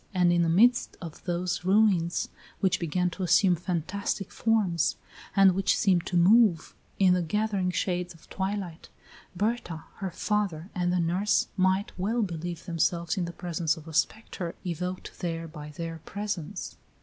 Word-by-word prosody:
And 175 -1 +4
in 175 - +3
the 165 - +2
midst 235 +8 +4
of 165 -4 -9
those 180 0 -1
ruins, 185 -3 +2 0.3
which 185 -2 +2
began 180 +2 0
to 190 - -8
assume 180 +1 +4
fantastic 185 +3 -3
forms, 205 -8 +1 0.4
and 195 -1 +6
which 195 +1 +2
seemed 185 -4 +2
to 180 - 0
move, 190 -1 +4 0.2
in 185 -2 +5
the 180 - +2
gathering 200 +1 0
shades 180 0 -2
of 165 - -19
twilight, 190 -3 -4 0.5
Berta, 200 -5 -2
her 195 - -3
father, 195 -2 -2
and 175 -2 0
the 180 - +1
nurse 180 +5 +1
might 190 +1 +2
well 220 +5 +1
believe 170 -2 -5
themselves 170 -1 0
in 185 - -1
the 170 - -5
presence 170 -2 -1
of 160 0 -12
a 160 - -8
spectre 170 +1 -1
evoked 180 +1 -4
there 165 -1 -3
by 150 -2 -9
their 165 +1 -6
presence. 200 -6 -5
180 Hz, 160 wpm, -28 LUFS, 170-195 Hz, 0.5 s, and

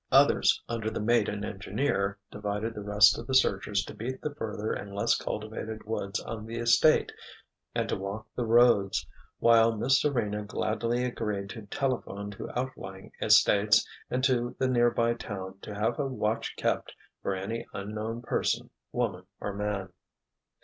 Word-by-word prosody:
Others, - - +5
under 115 -2 -2
the 110 - -4
mate 115 0 +3
and 105 0 -3
engineer, 100 0 -1
divided 105 +2 -3
the 105 - -6
rest 105 +1 +5
of - - -8
the 130 - 0
searchers 100 -4 +2
to - - -8
beat 120 +5 -5
the 150 - -2
further 110 -6 -3
and 100 0 -6
less 100 - +3
cultivated 110 +1 -5
woods 105 -1 -2
on 110 -1 -6
the 115 +1 -5
estate 120 +6 +4 0.6
and - - 0
to - - 0
walk 100 +3 -5
the 120 -2 -1
roads, 115 -4 +4 0.3
while 115 -1 +5
Miss 130 +5 +3
Serena 105 -7 0
gladly 115 +4 -1
agreed 105 -5 -3
to 110 -3 -9
telephone 105 -5 -2
to 100 - -7
outlying 95 -7 -6
estates, 105 +2 +5 0.2
and 130 +1 -1
to 125 -2 +1
the 130 - +1
nearby 120 -1 +3
town 95 -5 -7
to 105 - -7
have 110 +3 0
a 140 - +1
watch 115 -4 -2
kept - - -1 0.3
for 100 - -1
any 110 +5 -4
unknown 110 +4 -4
person, - - -1 0.2
woman 100 -7 -2
or 100 - -3
man. 100 -2 -3
110 Hz, 160 wpm, -29 LUFS, 100-120 Hz, 0.6 s, Others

